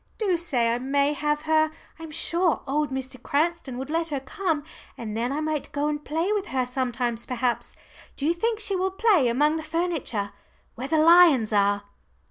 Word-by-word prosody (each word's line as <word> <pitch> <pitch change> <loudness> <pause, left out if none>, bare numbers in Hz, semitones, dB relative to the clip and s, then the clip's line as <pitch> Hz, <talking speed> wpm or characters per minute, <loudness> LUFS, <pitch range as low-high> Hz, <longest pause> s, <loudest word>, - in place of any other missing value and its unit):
Do 400 -5 +1
say 250 -9 +1
I 240 - -1
may 280 +3 +1
have 295 0 -1
her 315 0 +3 0.3
I'm 325 -1 -8
sure 340 +2 0
old 295 +2 0
Mr. 260 -1 -5
Cranston 300 -3 -1
would 265 +3 -5
let 330 +1 0
her 290 -4 -2
come, 315 +2 -2 0.3
and 220 -2 -5
then 235 +3 -1
I 295 +2 -2
might 310 -2 -2
go 290 +1 0
and 295 0 -3
play 330 +8 -1
with 415 -1 -2
her 255 -1 0
sometimes 245 -2 -2
perhaps. 250 -1 -2 0.4
Do 280 - -3
you 330 - +3
think 445 +5 -1
she 420 -2 0
will 375 +1 +1
play 385 - +3
among 295 +7 +2
the - - -4
furniture 310 - -2 0.4
where 255 +3 -5
the 315 - +1
lions 315 -9 +6
are?" 200 0 +2
295 Hz, 190 wpm, -25 LUFS, 255-335 Hz, 0.4 s, lions